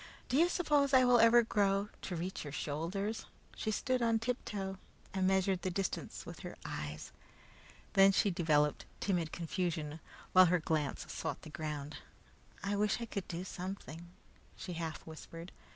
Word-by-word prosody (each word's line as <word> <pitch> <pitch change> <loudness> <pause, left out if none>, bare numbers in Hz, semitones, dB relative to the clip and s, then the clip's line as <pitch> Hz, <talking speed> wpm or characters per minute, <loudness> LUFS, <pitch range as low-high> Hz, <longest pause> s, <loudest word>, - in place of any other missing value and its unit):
"Do 250 - +1
you 340 +3 +5
suppose 290 -6 +3
I 260 - +8
ever 240 -2 +6
will 240 - +7
grow 200 -1 +2
to 180 - -4
reach 180 +3 -3
your 145 - -6
shoulders?" 175 +10 -3 0.3
She - - -2
stood 255 +4 0
on 230 -1 +3
tiptoe 210 -5 -3 0.3
and 190 -1 +2
measured 190 -1 +2
the 185 - -1
distance 190 +1 -3
with - - -8
her - - -7
eyes. 75 0 -5 0.8
Then 195 0 +7
she 195 +1 +3
developed 150 -4 +2
timid 175 -5 0
confusion, 165 -3 -2 0.3
while 185 0 +9
her 180 +1 +3
glance 155 -3 -1
sought - - -4
the 155 - -9
ground. 150 -2 -4 0.7
"I 200 +1 0
wish 210 +2 +1
I 235 - -3
could 200 -4 -4
do 175 +1 -4
something," 180 -3 -6 0.5
she 185 -1 -6
half 165 -2 -4
whispered. 165 +2 -9
185 Hz, 160 wpm, -34 LUFS, 165-210 Hz, 0.8 s, while